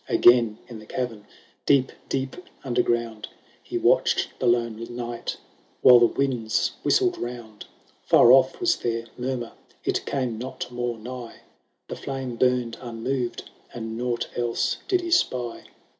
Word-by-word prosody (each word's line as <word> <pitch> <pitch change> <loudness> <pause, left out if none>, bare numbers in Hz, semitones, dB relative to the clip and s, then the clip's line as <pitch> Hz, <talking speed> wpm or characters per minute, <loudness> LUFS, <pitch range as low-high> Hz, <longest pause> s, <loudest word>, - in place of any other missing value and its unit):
Again 120 -3 +5
in 115 -3 -9
the 110 - -14
cavern, 115 -5 -4 0.4
deep 135 -2 +4 0.2
deep 130 0 -2 0.3
under 125 -3 +1
ground, 115 -2 -1 0.3
He - - -4
watched - - +3
the 130 - 0
lone 115 -2 +1
night, 120 -1 -4 0.4
while 125 -1 +9
the 120 - +6
winds 125 -4 0
whistled 365 -2 +2
round; 120 -3 -7 0.4
Far 120 - +6
off 130 0 +5
was 360 -2 +2
their 115 0 -2
murmur, 125 -2 -3 0.3
it - - -1
came 125 -5 -2
not 125 0 -6
more 120 -1 -3
nigh, 120 +1 -8 0.5
The - - -5
flame 135 -3 -5
burned 125 -1 +1
unmoved, 120 +1 -3 0.3
and 110 -1 -5
nought 120 0 -2
else 120 -1 0
did 370 -2 +2
he 345 -1 -5
spy. 125 - 0
120 Hz, 145 wpm, -25 LUFS, 115-130 Hz, 0.5 s, while